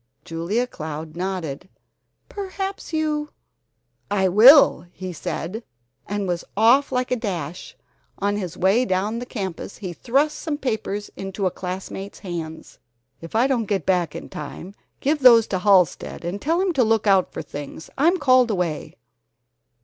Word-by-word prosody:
Julia 170 Hz, +9 st, -1 dB
Cloud 155 Hz, -6 st, -7 dB
nodded. 180 Hz, -4 st, -4 dB, 0.6 s
"Perhaps 390 Hz, -1 st, -5 dB
you 305 Hz, -2 st, -1 dB, 0.4 s
" -, -, -50 dB
"I 190 Hz, -2 st, +2 dB
will!" 215 Hz, -, +7 dB
he 185 Hz, 0 st, -7 dB
said, 185 Hz, +7 st, -5 dB, 0.4 s
and 205 Hz, -1 st, -2 dB
was 175 Hz, -1 st, -2 dB
off 245 Hz, +7 st, +5 dB
like 250 Hz, -1 st, -1 dB
a 250 Hz, -, +1 dB
flash. 180 Hz, -7 st, -5 dB, 0.4 s
On 205 Hz, +1 st, 0 dB
his 185 Hz, -4 st, -4 dB
way 195 Hz, +7 st, +3 dB
down 210 Hz, +1 st, -1 dB
the 245 Hz, -, -7 dB
campus 190 Hz, -5 st, -5 dB
he 185 Hz, -4 st, -6 dB
thrust 280 Hz, -, 0 dB
some 310 Hz, -3 st, -3 dB
papers 215 Hz, -6 st, -3 dB
into 195 Hz, +1 st, -4 dB
a 185 Hz, -, +2 dB
classmate's 190 Hz, +2 st, -6 dB
hands. 165 Hz, -4 st, -7 dB, 0.4 s
"If 165 Hz, +5 st, -9 dB
I 235 Hz, +3 st, +4 dB
don't 255 Hz, -4 st, +1 dB
get 200 Hz, -6 st, -1 dB
back 180 Hz, -5 st, +1 dB
in -, -, -7 dB
time, 165 Hz, +5 st, -8 dB, 0.3 s
give 295 Hz, +3 st, +1 dB
those 235 Hz, -4 st, +7 dB
to 190 Hz, -, -1 dB
Halsted 185 Hz, -3 st, +2 dB
and 185 Hz, +4 st, -4 dB
tell 330 Hz, +4 st, +1 dB
him 375 Hz, -1 st, +1 dB
to 265 Hz, -5 st, +3 dB
look 225 Hz, -1 st, +2 dB
out 195 Hz, -3 st, +3 dB
for -, -, -6 dB
things. 145 Hz, +2 st, -8 dB
I'm 335 Hz, +6 st, +3 dB
called 255 Hz, -5 st, +4 dB
away." 180 Hz, -7 st, -2 dB
200 Hz, 155 wpm, -23 LUFS, 180-250 Hz, 0.6 s, will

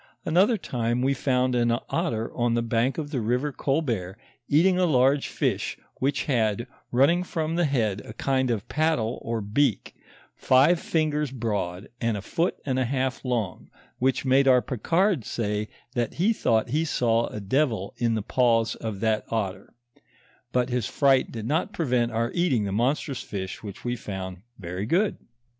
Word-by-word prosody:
Another 190 Hz, +8 st, +4 dB
time 120 Hz, -, -1 dB
we 135 Hz, +1 st, +3 dB
found 130 Hz, -1 st, +1 dB
an 120 Hz, -1 st, +2 dB
otter 135 Hz, -10 st, -1 dB
on 120 Hz, -1 st, +1 dB
the 120 Hz, -, +1 dB
bank 115 Hz, +3 st, 0 dB
of 150 Hz, -2 st, -4 dB
the 130 Hz, -6 st, -1 dB
river 125 Hz, +6 st, 0 dB
Colbert 120 Hz, -, -1 dB, 0.3 s
eating 180 Hz, +5 st, +4 dB
a 180 Hz, -, +3 dB
large 135 Hz, -1 st, +3 dB
fish, -, -, -1 dB, 0.2 s
which 135 Hz, 0 st, 0 dB
had, 115 Hz, -5 st, 0 dB, 0.3 s
running 145 Hz, +8 st, +4 dB
from 160 Hz, -3 st, -2 dB
the 175 Hz, 0 st, +2 dB
head, 110 Hz, -8 st, 0 dB
a 110 Hz, -, -9 dB
kind 130 Hz, +2 st, 0 dB
of 115 Hz, -1 st, -2 dB
paddle 150 Hz, -7 st, 0 dB
or 115 Hz, -1 st, -2 dB
beak, 110 Hz, +3 st, 0 dB, 0.4 s
five 140 Hz, +7 st, +4 dB
fingers 150 Hz, -3 st, 0 dB
broad 105 Hz, -7 st, -3 dB
and 115 Hz, -3 st, 0 dB
a -, -, -5 dB
foot 170 Hz, -, -1 dB
and 130 Hz, -2 st, 0 dB
a 130 Hz, -, +1 dB
half 130 Hz, +1 st, -1 dB
long, 120 Hz, -7 st, -2 dB, 0.3 s
which 130 Hz, +2 st, +1 dB
made 135 Hz, +1 st, +4 dB
our 130 Hz, -1 st, +7 dB
Picard 165 Hz, -, +1 dB
say, 105 Hz, -1 st, -2 dB, 0.3 s
that 120 Hz, -2 st, -1 dB
he 200 Hz, +7 st, +2 dB
thought 115 Hz, -, +1 dB
he 150 Hz, +6 st, +1 dB
saw 115 Hz, -6 st, +1 dB
a 105 Hz, -, -6 dB
devil 110 Hz, -1 st, 0 dB
in 115 Hz, -2 st, +1 dB
the 110 Hz, -, -2 dB
paws 115 Hz, -2 st, +2 dB
of 105 Hz, -3 st, -6 dB
that 110 Hz, -1 st, +1 dB
otter: 100 Hz, -3 st, -3 dB, 0.8 s
but 125 Hz, 0 st, +1 dB
his 125 Hz, -5 st, -1 dB
fright 135 Hz, -2 st, +3 dB
did 110 Hz, -2 st, -6 dB
not 160 Hz, -, 0 dB
prevent 125 Hz, -7 st, +1 dB
our 115 Hz, +2 st, -1 dB
eating 170 Hz, -11 st, +2 dB
the 100 Hz, -, -2 dB
mon 120 Hz, +8 st, +2 dB
strous 140 Hz, -4 st, -5 dB
fish 95 Hz, -2 st, -5 dB
which 105 Hz, +1 st, -9 dB
we 120 Hz, 0 st, 0 dB
found 95 Hz, -5 st, -6 dB, 0.2 s
very 90 Hz, +2 st, -5 dB
good. 190 Hz, -, +2 dB
125 Hz, 175 wpm, -26 LUFS, 110-145 Hz, 0.8 s, our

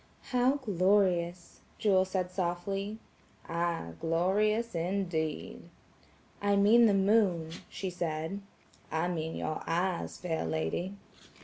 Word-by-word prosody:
"How 250 Hz, +2 st, +3 dB
glorious," 185 Hz, -6 st, +1 dB, 0.2 s
Jewel 190 Hz, -3 st, +3 dB
said 185 Hz, -1 st, -2 dB
softly. 195 Hz, +3 st, -2 dB, 0.5 s
"Ay 170 Hz, -, -2 dB
glorious 210 Hz, +7 st, +1 dB
indeed!" 170 Hz, -3 st, -2 dB, 0.7 s
"I 205 Hz, 0 st, +3 dB
mean 220 Hz, +4 st, +6 dB
the 205 Hz, -, +3 dB
moon," 190 Hz, -5 st, +3 dB, 0.2 s
she 190 Hz, -2 st, -4 dB
said. 165 Hz, +2 st, -3 dB, 0.5 s
"I 160 Hz, +2 st, 0 dB
mean 160 Hz, -2 st, -3 dB
your 155 Hz, -, -3 dB
eyes, 175 Hz, +2 st, -1 dB
fair 165 Hz, -3 st, -2 dB
lady." 80 Hz, -, -2 dB
185 Hz, 105 wpm, -31 LUFS, 165-200 Hz, 0.7 s, mean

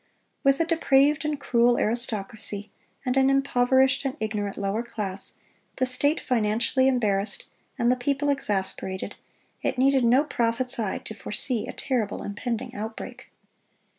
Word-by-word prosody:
With 275 Hz, -1 st, +4 dB
a 330 Hz, -, +3 dB
depraved 300 Hz, -2 st, +3 dB
and 300 Hz, -2 st, -1 dB
cruel 240 Hz, -2 st, +3 dB
aristocracy 215 Hz, -2 st, -1 dB, 0.3 s
and 250 Hz, 0 st, 0 dB
an 265 Hz, 0 st, +4 dB
impoverished 265 Hz, -1 st, +3 dB
and 270 Hz, +1 st, -3 dB
ignorant 210 Hz, -2 st, -3 dB
lower 200 Hz, +2 st, -1 dB
class, 200 Hz, -5 st, -4 dB, 0.4 s
the 255 Hz, -, +1 dB
state 285 Hz, +5 st, +2 dB
financially 235 Hz, +2 st, +2 dB
embarrassed, 210 Hz, -6 st, 0 dB, 0.3 s
and 240 Hz, -1 st, +3 dB
the -, -, +3 dB
people 280 Hz, +3 st, 0 dB
exasperated, 190 Hz, -7 st, -1 dB, 0.5 s
it -, -, -1 dB
needed 265 Hz, 0 st, +4 dB
no 250 Hz, +4 st, +5 dB
prophet's 245 Hz, -1 st, -1 dB
eye 210 Hz, -4 st, -1 dB
to -, -, -8 dB
foresee 220 Hz, +2 st, -2 dB
a -, -, -4 dB
terrible 235 Hz, -7 st, -2 dB
impending 235 Hz, +4 st, -4 dB
outbreak. 220 Hz, +1 st, -7 dB
245 Hz, 135 wpm, -26 LUFS, 215-270 Hz, 0.5 s, no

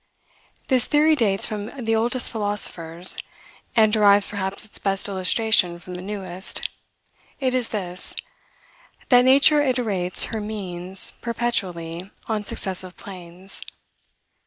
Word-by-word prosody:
This 255 Hz, -3 st, +4 dB
theory 310 Hz, +1 st, +4 dB
dates 205 Hz, -8 st, +1 dB
from 210 Hz, -2 st, -4 dB, 0.2 s
the 225 Hz, 0 st, +2 dB
oldest 240 Hz, +3 st, 0 dB
philosophers, 185 Hz, -5 st, 0 dB, 0.6 s
and 220 Hz, -2 st, +5 dB
derives 205 Hz, -2 st, +5 dB
perhaps 200 Hz, 0 st, -3 dB
its 215 Hz, -, -6 dB
best 195 Hz, 0 st, 0 dB
illustration 190 Hz, -1 st, +2 dB
from 180 Hz, +1 st, -10 dB
the 180 Hz, -, -6 dB
newest. 190 Hz, -2 st, -1 dB, 0.7 s
It 260 Hz, -2 st, 0 dB
is 250 Hz, -2 st, 0 dB
this: 185 Hz, -4 st, -3 dB, 0.9 s
that 250 Hz, -1 st, +7 dB
nature 280 Hz, +3 st, +6 dB
iterates 225 Hz, -10 st, +2 dB
her 220 Hz, -, -2 dB
means 190 Hz, -3 st, -3 dB
perpetually 185 Hz, -7 st, -3 dB, 0.2 s
on 215 Hz, -2 st, -1 dB
successive 185 Hz, -2 st, -5 dB
planes. 185 Hz, 0 st, -3 dB
205 Hz, 115 wpm, -23 LUFS, 185-230 Hz, 0.9 s, that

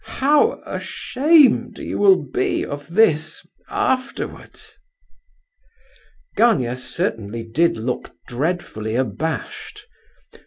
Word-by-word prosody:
how 300 Hz, -, +3 dB
ashamed 290 Hz, -1 st, +2 dB
you -, -, -5 dB
will 200 Hz, -2 st, +7 dB
be 130 Hz, -2 st, -1 dB
of 145 Hz, 0 st, -7 dB
this 160 Hz, -4 st, +1 dB, 0.2 s
afterwards!" 275 Hz, -11 st, -3 dB, 1.6 s
Gania 130 Hz, -, +3 dB
certainly 115 Hz, -3 st, -4 dB
did 135 Hz, +7 st, +1 dB
look 120 Hz, +3 st, -4 dB, 0.2 s
dreadfully 125 Hz, -6 st, -3 dB
abashed. 130 Hz, +3 st, -4 dB
155 Hz, 80 wpm, -21 LUFS, -, 1.6 s, will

